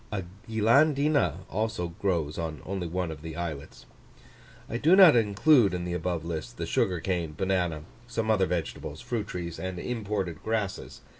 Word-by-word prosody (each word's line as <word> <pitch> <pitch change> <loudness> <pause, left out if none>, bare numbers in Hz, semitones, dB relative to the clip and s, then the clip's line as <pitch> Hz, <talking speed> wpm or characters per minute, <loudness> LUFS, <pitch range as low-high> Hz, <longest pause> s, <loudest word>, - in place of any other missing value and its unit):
A 100 -3 -2 0.3
Guilandina 135 - +3
also 110 -4 -2
grows 85 -4 -2
on 80 -2 -4
only 95 -2 -3
one 90 0 -2
of 75 -2 -8
the 80 0 -7
islets. 80 -4 -6 0.8
I 115 - -3
do 160 +9 +5
not 185 -7 +9
include 115 - +4
in 90 -1 -3
the 90 - -3
above 85 -1 -2
list 80 -2 -5
the - - -3
sugar 90 -2 +1
cane, 85 -3 -2
banana, 90 -5 0 0.2
some 115 -2 -1
other 95 -4 +3
vegetables, 80 -8 -4
fruit 110 -4 -3
trees, 85 -2 -5
and 95 -1 -4
imported 100 -6 -3
grasses. 110 -4 -3
95 Hz, 160 wpm, -28 LUFS, 85-110 Hz, 0.8 s, not